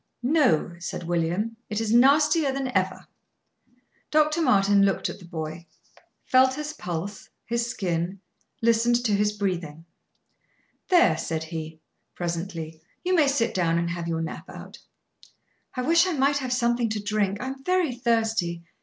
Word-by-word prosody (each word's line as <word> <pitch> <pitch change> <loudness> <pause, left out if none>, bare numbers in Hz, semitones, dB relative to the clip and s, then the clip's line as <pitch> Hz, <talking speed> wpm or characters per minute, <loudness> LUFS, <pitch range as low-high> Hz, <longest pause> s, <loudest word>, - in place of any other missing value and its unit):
"No," 250 - +2
said 175 - -5
William; 175 +7 -1
"it 210 0 -2
is 225 -1 0
nastier 290 +4 +4
than 265 -1 -3
ever." - - 0 1.0
Dr. 305 +2 +2
Martin 205 -8 +4
looked 195 -1 +1
at - - -8
the 180 - -13
boy; 160 0 -6 0.6
felt 260 0 +4
his 300 +1 -5
pulse, 180 - -6 0.2
his 235 0 -1
skin, 180 -2 -2 0.4
listened 230 +1 +3
to 220 - +2
his 205 +1 +2
breathing. 175 -6 -3 1.0
"There," 345 - +5
said 160 -1 -3
he, 160 0 -7 0.3
presently, 170 -2 -4 0.2
"you 365 - 0
may 315 -5 +4
sit 275 -4 +1
down 170 -2 +1
and 170 0 -1
have 170 -1 -4
your 165 -1 -1
nap 160 - -7
out." - - -10 1.0
"I 255 - -2
wish 335 +5 +4
I 365 - 0
might 280 0 +2
have 260 -3 -3
something 240 -1 +1
to 215 0 -2
drink; 205 -1 -1
I 250 - -4
am 270 0 -8
very 365 -5 +1
thirsty. 225 -8 0
210 Hz, 155 wpm, -25 LUFS, 170-260 Hz, 1.0 s, There